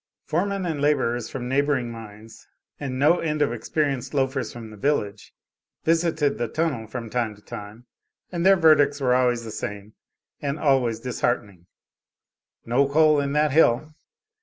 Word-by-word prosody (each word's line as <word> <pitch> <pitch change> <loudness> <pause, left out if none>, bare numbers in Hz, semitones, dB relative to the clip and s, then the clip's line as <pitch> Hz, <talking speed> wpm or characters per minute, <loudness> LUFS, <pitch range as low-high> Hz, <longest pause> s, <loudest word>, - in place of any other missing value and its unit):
Foremen 195 +3 -1
and 160 -4 -2
laborers 120 -5 +1
from 125 -2 -5
neighboring 135 -2 0
mines, 110 -1 -12 0.3
and 135 -3 -4
no 150 +6 +4
end 155 -2 -2
of 145 - -1
experienced 140 -3 -2
loafers 135 -3 0
from 115 -2 -9
the - - -10
village, 105 -4 -2 0.5
visited 160 -3 +1
the 120 - 0
tunnel 140 -4 -2
from 115 +1 -6
time 115 -2 -2
to 105 - -20
time, 110 +1 -9 0.5
and 170 -2 -2
their 195 +1 +7
verdicts 145 -4 +4
were 130 -2 +2
always 125 -2 +2
the 110 - -7
same 105 0 -6 0.5
and 140 0 -2
always 130 -7 +2
disheartening 115 -7 -2 1.0
"No 135 +4 +2
coal 155 0 +4
in 140 0 -1
that 150 0 +2
hill." 155 0 +3
135 Hz, 155 wpm, -24 LUFS, 115-150 Hz, 1.0 s, their